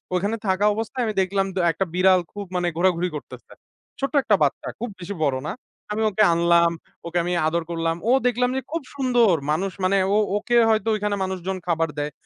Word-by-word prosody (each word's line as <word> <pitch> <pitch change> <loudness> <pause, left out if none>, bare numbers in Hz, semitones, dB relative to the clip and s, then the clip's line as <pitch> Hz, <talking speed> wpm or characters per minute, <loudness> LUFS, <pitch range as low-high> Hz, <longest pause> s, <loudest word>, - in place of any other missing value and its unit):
ওখানে 200 +5 0
থাকা 190 +2 +2
অবস্থায় 225 +3 -3
আমি 215 - -2
দেখলাম 195 +1 0
ডা 185 - +1
একটা 195 - -2
বিড়াল 185 0 +4
খুব 205 -1 -6
মানে 180 -1 0
ঘোরাঘুরি 180 0 +2
করতেছে। 150 - -10 0.5
ছোট্ট 275 +2 -2
একটা 210 - +3
বাচ্চা 140 - -1
খুব 240 0 -3
বেশি 185 +3 -6
বড় 135 -3 +1
না। - - -2 0.4
আমি 215 +1 -1
ওকে 215 +2 +2
আনলাম, 170 0 +4 0.3
ওকে 170 +1 -3
আমি 180 - -1
আদর 170 +1 0
করলাম। 165 0 -1
ও - - +5 0.2
দেখলাম 250 0 +1
যে - - -1
খুব 330 0 -2
সুন্দর। 245 -8 +3 0.2
মানুষ 190 +5 0
মানে 190 +2 +3 0.2
ও - - +3 0.2
ওকে 240 +3 -1
হয়তো 220 0 +1
ওইখানে 210 -1 -1
মানুষজন 190 0 -3
খাবার 165 -1 +1
দেয়। 145 0 -2
190 Hz, 195 wpm, -23 LUFS, 170-215 Hz, 0.5 s, ও